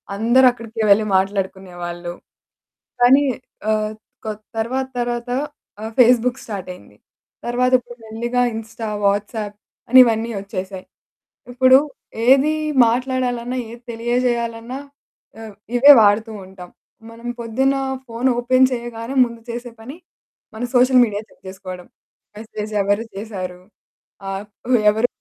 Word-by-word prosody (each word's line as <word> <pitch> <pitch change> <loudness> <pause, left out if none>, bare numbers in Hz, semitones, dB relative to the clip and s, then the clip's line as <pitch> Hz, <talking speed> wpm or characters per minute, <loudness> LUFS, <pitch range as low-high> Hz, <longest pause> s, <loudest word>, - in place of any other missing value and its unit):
అందరు 240 +5 +4
అక్కడికే 230 -2 -7
వెళ్లి 215 +2 +5
మాట్లాడుకునేవాళ్ళు. 185 -3 -3 0.9
కానీ 265 +4 +6 0.5
ఆహ్, 215 0 0 0.3
క్ - - -5 0.3
తర్వాత 260 +4 -1
తర్వాత 240 0 -2 0.5
ఆహ్, 220 +1 -5
ఫేస్‌బుక్ 245 +1 +4
స్టార్ట్ 195 -4 -6
అయింది. - - -19 0.5
తర్వాత 250 +1 +1
ఇప్పుడు 240 0 -13
మెల్లిగా 235 +3 -2
ఇన్‌స్టా, 225 0 -6 0.2
వాట్సాప్ 205 +1 -1 0.3
అని 260 +2 +8
ఇవన్నీ 230 -1 0
వచ్చేసాయి. 190 -1 -6 0.7
ఇప్పుడు 260 +1 +6 0.5
ఏది 275 +4 +5 0.3
మాట్లాడాలన్నా 250 0 -1
ఏది 235 +1 -11
తెలియజేయాలన్నా 235 +1 -2 0.6
ఆహ్, 220 -2 -10 0.2
ఇవే 280 +4 +9
వాడుతూ 215 +2 +3
ఉంటాం. 185 -1 -12 0.4
మనం 230 +1 -10
పొద్దున్న 265 +4 +1 0.3
ఫోన్ 235 +2 -1
ఓపెన్ 255 +2 +4
చేయగానే 235 +1 -5
ముందు 235 -1 -9
చేసే 240 +1 -6
పని 265 +8 -9 0.6
మన 225 - -5
సోషల్ 250 +1 +6
మీడియాని 210 0 -6
చెక్ - - -25
చేసుకోవడం. 185 -2 -9 0.5
మెసేజ్ 215 -1 -7
ఎవరు 205 +3 +1
చేసారు? 185 -4 -6 0.7
ఆహ్, 195 +1 -5 0.5
ఎవరు 220 +3 +1
230 Hz, 115 wpm, -20 LUFS, 205-245 Hz, 0.9 s, ఇవే